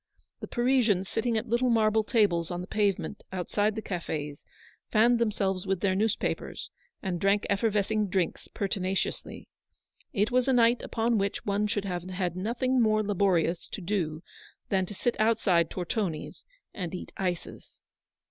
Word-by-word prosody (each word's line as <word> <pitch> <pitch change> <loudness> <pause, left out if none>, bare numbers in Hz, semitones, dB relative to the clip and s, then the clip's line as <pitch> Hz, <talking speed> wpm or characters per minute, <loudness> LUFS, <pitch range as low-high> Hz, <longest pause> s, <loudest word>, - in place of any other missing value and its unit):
The - - -6
Parisians 240 -7 +2
sitting 225 +2 0
at 220 - -2
little 240 +3 +2
marble 220 -1 +3
tables 200 -7 +2
on 175 -1 -3
the - - -5
pavement 205 0 -1
outside 205 +3 0
the 220 - -4
cafes 150 -5 -4 0.5
fanned 235 +2 +4
themselves 195 -4 0
with 190 -2 0
their 195 -2 +2
newspapers, 210 +2 -1 0.3
and 180 -3 -2
drank 200 +1 +3
effervescing 210 0 +1
drinks 185 -2 -1
pertinaciously. 195 -2 -3 0.6
It 205 +3 +1
was 250 +1 +2
a 265 - +4
night 235 0 +4
upon 230 -1 0
which 200 +1 -2
one 205 +1 +1
should 205 -1 -1
have 180 -2 -2
had 180 -1 -3
nothing 240 +6 +1
more 215 -1 +3
laborious 185 -4 +1
to - - -6
do 170 -4 -2 0.5
than 190 -2 +1
to 205 - -7
sit 240 +5 0
outside 210 -7 +3
Tortoni's 180 -3 -3 0.3
and 180 -2 -4
eat - - -7
ices. 180 -3 -4
200 Hz, 150 wpm, -28 LUFS, 185-220 Hz, 0.6 s, fanned